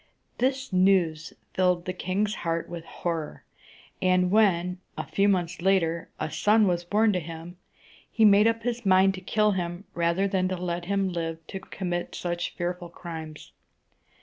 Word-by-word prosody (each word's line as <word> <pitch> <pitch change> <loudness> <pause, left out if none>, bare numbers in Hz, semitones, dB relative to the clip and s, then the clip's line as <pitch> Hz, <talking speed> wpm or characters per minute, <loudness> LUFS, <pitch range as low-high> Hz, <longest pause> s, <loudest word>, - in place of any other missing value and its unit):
This 265 -2 0
news 180 -4 +2 0.2
filled 180 -2 +2
the 185 - -2
king's 195 +3 -1
heart 165 0 -1
with 170 -1 -7
horror; 165 -3 -4 0.6
and 185 0 +3
when, 180 -4 +3 0.2
a - - -3
few 200 +1 +2
months 175 -3 0
later, 170 -3 +1
a - - -3
son 215 +1 +4
was 175 -2 +1
born 210 +4 +2
to 180 - +1
him, 165 +2 -9 0.5
he 220 - +4
made 205 +1 +6
up 230 0 0
his 240 0 -2
mind 190 0 +5
to 185 - -8
kill 210 +2 +2
him 175 -1 -3
rather 170 +3 +1
than 190 -1 +1
let 175 -1 -3
him 195 0 0
live 165 -1 -4
to 190 - -5
commit 180 -2 -4
such 175 -1 -3
fearful 175 0 -3
crimes. 160 -3 -9
180 Hz, 160 wpm, -26 LUFS, 170-195 Hz, 0.6 s, made